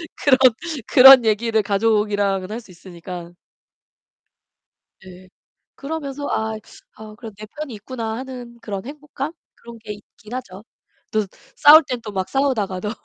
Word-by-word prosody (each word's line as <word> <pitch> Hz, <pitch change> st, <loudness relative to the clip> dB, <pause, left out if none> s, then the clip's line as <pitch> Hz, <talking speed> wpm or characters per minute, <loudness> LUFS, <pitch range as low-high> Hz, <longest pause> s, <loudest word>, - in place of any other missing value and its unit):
그런 265 Hz, -3 st, +3 dB, 0.5 s
그런 265 Hz, -1 st, +9 dB
얘기를 220 Hz, +1 st, +1 dB
가족이랑은 205 Hz, -2 st, 0 dB
할 230 Hz, -, -4 dB
수 205 Hz, -, -18 dB
있으니까. 175 Hz, -1 st, -10 dB, 1.7 s
네. 185 Hz, 0 st, -14 dB, 0.5 s
그러면서 285 Hz, -1 st, -6 dB
아 220 Hz, 0 st, -2 dB, 0.4 s
'아 215 Hz, 0 st, -11 dB
그래도 220 Hz, -3 st, -10 dB
내 215 Hz, -, -9 dB
편이 295 Hz, +2 st, -8 dB
있구나.' 225 Hz, +1 st, -6 dB
하는 250 Hz, -2 st, -9 dB
그런 200 Hz, -2 st, -6 dB
행복감? 295 Hz, +1 st, -7 dB, 0.2 s
그런 235 Hz, -1 st, -13 dB
게 215 Hz, -1 st, -8 dB
있긴 210 Hz, +3 st, -13 dB
하죠. 200 Hz, -6 st, -8 dB, 0.5 s
또 215 Hz, -2 st, 0 dB, 0.3 s
싸울 310 Hz, +2 st, +8 dB
땐 250 Hz, -2 st, -3 dB
또 210 Hz, -2 st, -8 dB
막 190 Hz, -1 st, -3 dB
싸우다가도 210 Hz, -8 st, -1 dB
220 Hz, 270 characters per minute, -20 LUFS, 200-260 Hz, 1.7 s, 그런